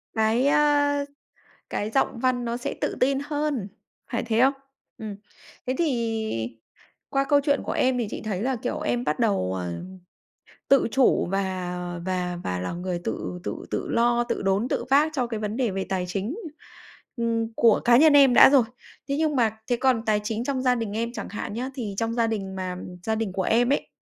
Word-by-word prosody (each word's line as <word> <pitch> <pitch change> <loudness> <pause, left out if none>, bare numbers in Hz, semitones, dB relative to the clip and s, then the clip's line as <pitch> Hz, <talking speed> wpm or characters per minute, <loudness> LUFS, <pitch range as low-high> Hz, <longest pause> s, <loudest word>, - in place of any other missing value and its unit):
Cái, 225 +5 +2
ờ, 290 -1 +3 0.6
cái 210 - -2
giọng 235 -1 0
văn 250 -1 +1
nó 235 +1 -2
sẽ 245 - -4
tự - - -1
tin 270 +2 +3
hơn, 290 -8 -2 0.4
phải 235 - -1
thế 230 0 +1
không? 270 +2 +5 0.4
Ừm. 215 -2 -6 0.5
Thế 255 - 0
thì 225 - -1 0.5
qua 275 0 +1
câu 285 -1 +6
chuyện 285 -1 +1
của - - -3
em 255 -1 +1
thì 230 -3 -1
chị - - -6
thấy 200 -3 -2
là, 260 +2 0
kiểu, 245 +2 -3
em 245 0 -1
bắt - - -1
đầu, 195 - +1
ờm, 175 - -6 0.7
tự 275 -3 +5
chủ 265 -8 +3
và 185 -2 -2 0.3
và 180 -1 -2
và 90 0 -2
là 90 - -3
người 175 0 -3
tự 180 - -4
tự - - -5
tự - - -2
lo, 240 +1 +2
tự - - -3
đốn, 195 +5 +1
tự - - -1
vác 290 +3 +5
cho 250 -5 0
cái 225 -2 -4
vấn 215 +2 -3
đề 245 -4 +1
về 190 0 -2
tài 185 -2 -1
chính, 200 - -3 0.8
ừm, 230 -1 -1
của 230 -2 +5
cá 240 0 +7
nhân 310 +1 +6
em 275 -3 +7
đã - - +9
rồi. 270 -4 +5 0.5
Thế 280 - +1
nhưng 310 -2 +1
mà 220 -3 +1
thế 245 - +3
còn 250 -2 +1
tài 210 -1 +2
chính 225 +2 -2
trong 265 -1 -1
gia 250 -1 +3
đình 225 -4 -3
em 235 +1 -1
chẳng - - -6
hạn 205 - -5
nhá, 250 +4 -3
thì 215 -7 -4
trong 225 0 -1
gia 230 -1 +1
đình, 195 -4 -3
mà 185 -1 -4 0.3
gia 220 +2 0
đình 220 -3 -2
của 190 -1 -1
em 240 +5 +3
ấy, - - -2
230 Hz, 205 wpm, -25 LUFS, 200-260 Hz, 0.8 s, đã